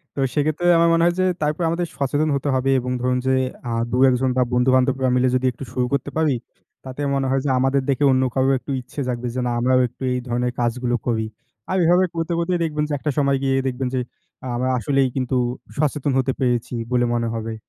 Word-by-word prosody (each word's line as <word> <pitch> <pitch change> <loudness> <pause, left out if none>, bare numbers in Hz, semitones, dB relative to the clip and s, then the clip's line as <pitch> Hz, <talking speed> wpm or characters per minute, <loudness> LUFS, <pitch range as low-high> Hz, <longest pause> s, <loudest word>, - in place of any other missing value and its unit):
তো - - -5
সেক্ষেত্রে 155 +3 0
আমার 170 0 +4
মনে 165 0 +3
হয় 175 0 +2
যে 185 - +3 0.2
তারপর 150 +3 0
আমাদের 170 +1 -1
সচেতন 145 +3 0
হতে 140 +1 -2
হবে 130 +1 0
এবং 125 +1 -4
ধরুন 125 0 +1
যে 130 - +3 0.4
আ - - -2 0.2
২ 125 +2 +3
১ 125 - +2
জন 130 - +2
বা 125 - +4
বন্ধু 125 +1 +3
বান্ধবরা 130 0 +2
মিলে 125 +1 +3
যদি 130 0 0
একটু 125 - -10
শুরু 125 -1 0
করতে 140 +1 -1
পারি, 155 -5 +2 0.5
তাতে 130 +2 -7
মনে 135 -1 0
হয় 135 0 +1
যে - - +1
আমাদের 135 +1 +2
দেখে 140 +1 +1
অন্য 130 0 +3
কারও 135 0 +2
একটু 130 +3 -7
ইচ্ছে 140 +3 -7
থাকবে 125 0 -3
যে - - -1
না 120 - 0
আমরাও 130 +1 +3
একটু 120 - -23
এই 125 - -1
ধরনের 120 +1 -1
কাজগুলো 120 +1 0
করি। 110 -2 0 0.5
আর 190 - +1
এভাবে 180 +2 +4
করতে 165 +1 -2
করতেই 175 +1 0
দেখবেন 150 -2 -1
যে - - -2
একটা 150 - -1
সময় 140 -1 +2
গিয়ে 135 0 +2
দেখবেন 130 0 -2
যে 130 - +1 0.5
আ - - -4
আমরা 130 +2 0
আসলেই 135 +3 +1
কিন্তু 130 0 0 0.4
সচেতন 145 -1 0
হতে 130 0 +1
পেরেছি 125 -1 0 0.2
বলে 120 -1 +2
মনে 115 -1 0
হবে। 115 0 -4
130 Hz, 225 wpm, -22 LUFS, 125-145 Hz, 0.5 s, আমার